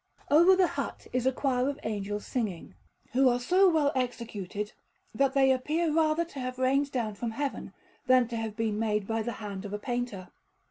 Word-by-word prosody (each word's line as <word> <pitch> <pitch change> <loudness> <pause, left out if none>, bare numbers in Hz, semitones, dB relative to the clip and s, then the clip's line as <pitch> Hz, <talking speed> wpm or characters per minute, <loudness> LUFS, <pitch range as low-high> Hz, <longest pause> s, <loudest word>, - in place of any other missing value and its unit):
Over 345 +6 +7
the 370 -1 +4 0.2
hut - - -7
is 255 0 +1
a - - +4
choir 260 -1 0
of 285 +1 -5
angels 205 -1 -3
singing, 210 -9 -3 0.4
who 260 +1 +4
are 245 0 +1
so 365 +9 +4
well 305 -4 +2
executed, 215 -5 -3 0.4
that 275 +4 +1
they 270 -1 +5
appear 305 +5 0
rather 320 +1 +2
to 290 -4 -9
have 255 0 -4
rained 275 +2 +1
down 230 -5 -2
from 230 +3 -4
Heaven 275 +5 -4 0.4
than 255 -2 +5
to 235 - -4
have 225 -2 -3
been 220 -2 -1
made 210 -2 0
by 225 +2 -1
the 235 +2 -3
hand 200 -3 -6
of 205 -1 -7
a - - -1
painter. 240 -5 -4
250 Hz, 195 wpm, -29 LUFS, 215-275 Hz, 0.4 s, Over